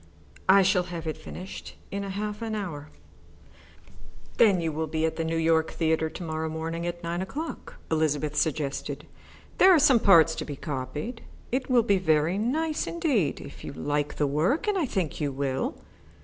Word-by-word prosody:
"I 195 0 +8
shall 185 -1 +3
have 170 -2 -5
it 155 - -2
finished 185 +2 -9 0.2
in 200 - -2
half 205 +2 -4
an 225 -1 -2
hour." 155 -8 -5 1.5
"Then 215 -4 +6 0.2
will 160 +1 -2
you - - -14
be 160 0 +1
at 160 - -1
the 165 - -2
New 165 0 -1
York 160 0 +3
Theatre 160 -1 +1
to 175 - -8
morrow 160 -1 -3
morning 165 +2 -3
at 175 0 -5
nine 170 +1 -2
o'clock," 300 +12 -6 0.2
Elizabeth 150 -1 +1
suggested. 150 -2 -1 0.5
"There 380 - +8
are 355 - +7
some 275 -5 +6
parts 165 -6 +6
to - - -2
be 145 - -6
copied. 150 - -5 0.3
It 260 +2 -1
will 245 -2 +5
be 200 -4 +3
very 160 +2 +2
nice 305 +8 0
indeed 290 - 0
if 140 - -11
you - - -6
like 145 +1 -2
the 150 - +1
work, 165 - +1
and 415 - +2
I 340 -7 +1
think 180 -8 -2
you 145 -2 0
will." 135 -1 -2
165 Hz, 180 wpm, -27 LUFS, 155-210 Hz, 1.5 s, I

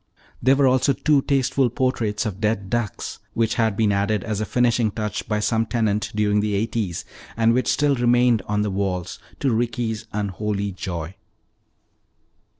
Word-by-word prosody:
There 130 +2 +5
were 140 0 +3
also 130 +1 +3
two 145 0 +2
tasteful 135 -2 +1
portraits 115 -4 -1
of 100 -2 -4
dead 105 -3 -1
ducks 120 -5 -3 0.2
which 115 -1 +1
had 110 -4 +1
been 110 -2 +3
added 100 +1 0
as 110 -2 -2
a 110 - -2
finishing 120 0 +2
touch 105 -1 -4
by 105 0 0
some 110 +1 +1
tenant 110 -3 0
during 105 -1 +2
the 105 -1 0
eighties 105 -4 -2 0.3
and 115 0 +4
which 130 +1 +1
still 145 -1 +2
remained 120 -2 +3
upon 105 +2 -1
the 105 - -1
walls 95 -2 -2 0.2
to 135 -4 +2
Ricky's 115 -1 -2
unholy 100 0 -2
joy. 85 -3 -5
110 Hz, 160 wpm, -23 LUFS, 105-120 Hz, 0.3 s, There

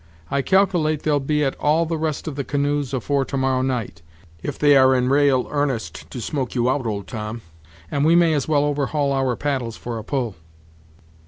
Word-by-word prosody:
I 140 - +1
calcilate 175 -4 +2
they'll 150 -2 +2
be 150 +2 0
at 135 - 0
all 155 +3 +2
the 165 0 -2
rest 155 -1 -3
of 150 - -4
the 140 - -2
canoes 145 -1 -1
afore 135 +2 0
to 135 - -4
morrow 130 -1 +1
night, 125 -10 -3 0.4
if - - -4
they 145 -1 +5
are 130 -1 +6
in 125 0 +1
ra'al 140 -2 +3
'arnest 145 -6 -3
to 125 - -7
smoke 130 +2 -3
you 125 +1 +2
out, 130 -3 -1
old 100 -3 -3
Tom, 110 +1 -6 0.5
and 140 -1 0
we 165 +2 +5
may 170 -2 +4
as 145 -4 -1
well 145 -2 +2
overhaul 145 0 0
our 135 -2 0
paddles 130 -6 -2
for 120 -2 -5
a - - -8
pull." 120 -3 -2
140 Hz, 200 wpm, -22 LUFS, 125-150 Hz, 0.5 s, are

